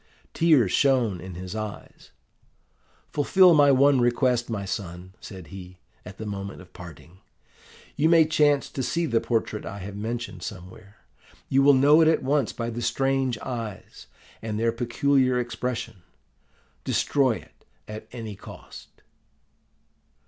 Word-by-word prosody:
"Tears 150 - +3
shone 120 - +2
in 95 -1 -9
his 90 +3 -7
eyes. 110 -1 -8 1.0
'Fulfil 180 +5 +5
my 145 -2 +5
one 135 0 +4
request, 120 0 +1
my 100 -3 -3
son,' 95 -2 -6
said 95 -5 -10
he, 90 -1 -10 0.3
at 95 +1 -11
the 110 - -7
moment 100 -1 -6
of 90 - -15
parting. 85 +1 -13 0.8
'You 155 +2 +2
may 165 -2 +6
chance 150 -2 +2
to 135 - -4
see 170 +6 -1
the 115 -7 +1
portrait 110 -2 -2
I 100 - -7
have 100 +1 -8
mentioned 115 +3 -5
somewhere. 100 +2 -10 0.5
You 135 - +3
will 140 0 +6
know 145 +4 +5
it 160 - +5
at 160 - +2
once 140 -2 +1
by 115 0 -4
the 120 +1 -5
strange 130 +1 0
eyes, 115 -6 -7 0.3
and 110 -1 -4
their 115 0 +2
peculiar 125 +2 +1
expression. 120 -4 -4 0.8
Destroy 135 -4 +1
it - - -12 0.2
at 110 0 -8
any 115 -4 -7
cost. 95 - -13
115 Hz, 140 wpm, -25 LUFS, 100-135 Hz, 1.0 s, may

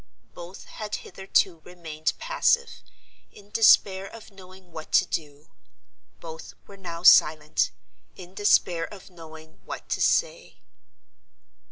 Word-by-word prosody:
Both 175 +2 -11
had 210 -1 -6
hitherto 190 -2 -1
remained 160 -2 -5
passive, 485 -1 0 0.5
in 205 0 -18
despair 195 -3 +4
of 225 0 -13
knowing 185 -2 -16
what 160 -1 -10
to - - +5
do. 150 -1 -6 0.7
Both 160 -1 -10
were 200 - -14
now 170 -3 -8
silent, 155 -3 +5 0.5
in 180 0 -13
despair 180 -4 +1
of 195 -2 -13
knowing 160 -2 -14
what - - -9
to - - -2
say. - - -1
180 Hz, 120 wpm, -25 LUFS, 160-200 Hz, 0.7 s, to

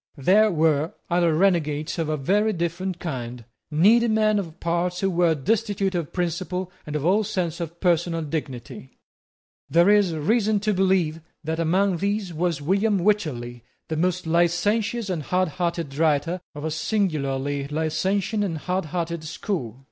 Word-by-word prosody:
There 200 +10 +4
were 160 -3 +1 0.2
other 170 -2 +3
renegades 155 -4 +1
of 160 -2 -1
a 155 - 0
very 205 +10 +1
different 175 +1 -2
kind, 125 -8 -5 0.2
needy 210 +10 +4
men 215 -1 +2
of 170 -3 -7
parts 175 +1 -1
who 195 -1 +1
were 170 -2 +3
destitute 200 - 0
of 170 -4 -3
principle 180 +1 -2 0.2
and 150 - -4
of 150 0 -2
all 200 +5 +3
sense 180 -5 -2
of 170 0 -6
personal 170 -2 +1
dignity. 135 -4 -6 0.7
There 170 +4 +5
is 200 -5 +3
reason 210 +6 +2
to 210 0 +1
believe 185 -4 +1 0.2
that 160 +1 -2
among 180 +3 +2
these 200 -1 -2
was 165 -2 -1
William 200 +6 +2
Wycherley, 125 - -1 0.3
the 160 - -1
most 180 +2 0
licentious 200 +7 +1
and 180 -5 -2
hardhearted 170 -3 -1
writer 160 +3 +1
of 145 +1 -6
a 160 - -1
singularly 145 -6 -1
licentious 190 +7 0
and 170 -5 -2
hardhearted 170 -1 -3
school. 155 - -4
170 Hz, 150 wpm, -24 LUFS, 155-195 Hz, 0.7 s, There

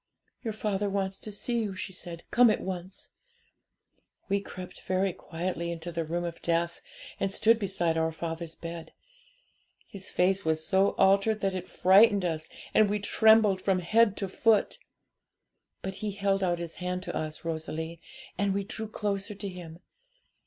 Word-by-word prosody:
"'Your 225 - -3
father 205 -1 -1
wants 195 -1 -2
to 215 - -7
see 235 +4 -1
you," 205 -3 -3
she 190 +1 -5
said; 170 -2 -8
"come 245 -1 +6
at 215 - +2
once." 185 0 -6 1.2
'We 200 0 +2
crept 185 -2 -9
very 185 0 0
quietly 170 +1 -4
into 170 +1 -5
the 165 0 -2
room 170 +2 -2
of 170 -1 -5
death, 170 0 0 0.4
and 195 - 0
stood 225 +3 +4
beside 180 -5 0
our 160 0 +1
father's 165 0 -5
bed. 165 -1 -8 0.9
His 190 -2 -6
face 190 +2 +2
was 160 0 +1
so 195 +1 +3
altered 200 +3 +4
that 195 -1 +1
it 185 -1 -5
frightened 200 +1 +5
us, 160 -2 -2 0.2
and 215 -2 +5
we 210 - +1
trembled 210 -1 +4
from 190 -1 +2
head 210 +4 +3
to 195 - -2
foot. 215 +3 +2 1.0
But 190 - -3
he 215 - -1
held 195 -1 +1
out 175 -2 +1
his 170 -1 -6
hand 180 0 -3
to - - -5
us, 155 +1 -4
Rosalie, 160 0 -4 0.4
and 200 -1 +1
we 200 - 0
drew 220 +2 -5
closer 205 -1 -3
to 200 +1 -5
him. 175 -2 -9
190 Hz, 165 wpm, -29 LUFS, 170-200 Hz, 1.2 s, come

